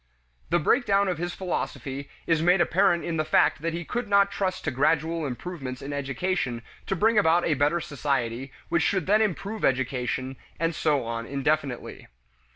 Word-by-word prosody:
The 170 - +3
breakdown 200 - +2
of 180 -3 -1
his 175 +1 -3
philosophy 140 -6 -4 0.2
is 165 -2 +2
made 180 +3 +4
apparent 175 0 +3
in 165 -1 -2
the 155 - +1
fact 155 -1 +3
that 165 +1 -1
he 170 0 -4
could 240 +4 -3
not 200 0 +4
trust 185 -1 -2
to 155 - -1
gradual 155 +3 +1
improvements 130 0 -6
in 140 +1 -6
education 140 -3 -2 0.2
to 195 - 0
bring 220 +3 +4
about 170 -2 +3
a 160 - +2
better 145 +4 +2
society 135 -4 -2 0.2
which 170 -1 +1
should 180 0 +1
then 210 +2 +4
improve 210 +1 -2
education, 130 0 -1 0.2
and 165 +1 +1
so 150 -3 +1
on 115 0 -4
indefinitely. 140 -1 -2
160 Hz, 170 wpm, -26 LUFS, 135-185 Hz, 0.2 s, made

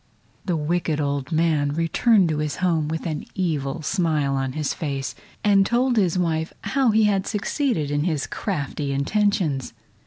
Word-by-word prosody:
The 175 -4 0
wicked 160 0 0
old 140 -1 -2
man 155 -3 +2
returned 180 +5 +3
to 155 -1 -1
his 150 -1 -2
home 165 -4 +1
with 160 +2 -3
an 155 -3 -3
evil 155 -4 -2
smile 155 -5 +1
on 135 -1 -1
his 150 -1 -1
face, 135 -4 -3 0.3
and 200 -2 +5
told 245 +4 +1
his 185 -5 +2
wife 160 -2 0
how 270 -2 +1
he 220 0 +4
had 200 -2 +2
succeeded 210 - -1
in 145 +1 0
his 155 -5 0
crafty 145 -6 -3
intentions. 155 - 0
160 Hz, 160 wpm, -23 LUFS, 145-195 Hz, 0.3 s, and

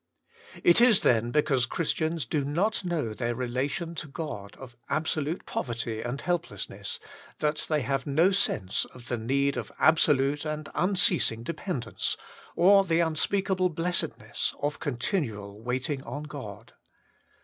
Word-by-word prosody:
It 175 +6 +6
is, 240 -5 +7
then, 115 -1 +3
because 135 -2 +2
Christians 160 -2 -1
do 145 +5 0
not 185 +11 0
know 160 -11 -1
their 120 +1 -2
relation 135 +8 -2
to 155 - -5
God 135 -10 -6
of 125 -2 -11
absolute 155 +2 -1
poverty 115 -2 -3
and 120 +4 -3
helplessness, 175 0 -3 0.4
that 150 0 -1
they 155 -2 +2
have 135 +1 -1
no 160 +7 +4
sense 105 - +1
of 125 -1 -13
the 120 - 0
need 140 +4 +1
of 115 -4 -4
absolute 145 -3 +3
and 155 -1 -4
unceasing 180 - +3
dependence, 150 - -2 0.4
or 195 +3 +6
the 165 -3 +1
unspeakable 185 +4 +1
blessedness 175 +2 -1
of 145 +1 -2
continual 115 - -2
wait 125 +2 -2
ing 145 -3 -2
on 145 +2 -6
God. 140 -10 -9
145 Hz, 140 wpm, -28 LUFS, 125-170 Hz, 0.4 s, is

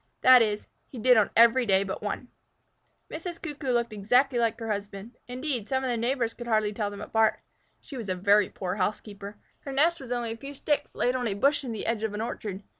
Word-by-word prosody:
That 255 -1 +8
is, 210 -2 0 0.2
he 260 - -11
did 250 +2 +5
on 215 -3 +4
every 235 +2 +6
day 195 -1 +4
but 190 -1 -5
one. 210 +4 -4 0.8
Mrs. 335 +1 -6
Cuckoo 295 -4 -5
looked 235 -2 0
exactly 245 +5 +2
like 230 -1 0
her 225 -1 -3
husband. 200 +2 -6
Indeed, 250 -3 -3
some 265 -1 0
of 260 - -1
their 240 - 0
neighbors 235 0 -1
could 240 0 -9
hardly 215 -2 +1
tell 205 -1 -2
them 205 0 -9
apart. 220 +1 +1 0.4
She 275 - -9
was 225 -5 -6
a 185 - 0
very 200 +2 +3
poor 185 0 -4
housekeeper. 205 +1 -4 0.2
Her 275 - -8
nest 325 +5 +2
was 255 -2 -9
only 240 -2 -2
a 225 - -6
few 275 +4 -9
sticks 295 +2 -1
laid 250 +1 +1
on 250 -2 -1
a 200 - -2
bush 280 +8 +2
in 250 - -5
the 220 - -5
edge 230 -2 -1
of 220 -2 -2
an 210 - -3
orchard. 210 -3 -5
230 Hz, 230 wpm, -27 LUFS, 210-255 Hz, 0.8 s, That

